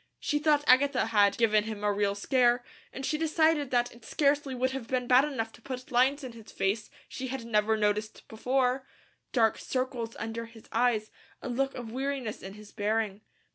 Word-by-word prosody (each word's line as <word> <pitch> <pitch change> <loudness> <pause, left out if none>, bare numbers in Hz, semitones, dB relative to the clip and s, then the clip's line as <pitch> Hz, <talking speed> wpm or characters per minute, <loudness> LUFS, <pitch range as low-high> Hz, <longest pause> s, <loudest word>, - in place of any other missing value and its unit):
She 295 - 0
thought 295 -1 +3
Agatha 265 -1 +4
had 205 -3 +3
"given 215 -2 +3
him 215 -2 -6
a 205 0 +2
real 200 0 0
scare," 245 +3 +2 0.3
and 270 - -6
she 305 - -1
decided 315 -3 +2
that 245 -1 +1
it 235 -1 -17
scarcely 280 0 +1
would 260 +1 0
have 265 -3 -5
been 255 -1 -1
bad 255 +3 +5
enough 225 -7 -3
to - - -16
put 255 +2 -7
lines 265 +4 +3
in 255 - -6
his 225 -2 -13
face 210 +3 -1 0.2
she 260 -1 -6
never 230 -4 0
had 215 - -4
noticed 210 +1 -1
before, 255 +3 0 0.4
dark 225 -4 +2
circles 255 -3 -3
under 230 +1 -5
his 225 -1 -16
eyes, 230 -2 +1 0.3
a - - -4
look 270 +3 -1
of 240 -3 -7
weariness 265 -3 -3
in 195 +1 -8
his 210 -1 -13
bearing. 210 -1 -1
245 Hz, 190 wpm, -29 LUFS, 220-265 Hz, 0.4 s, bad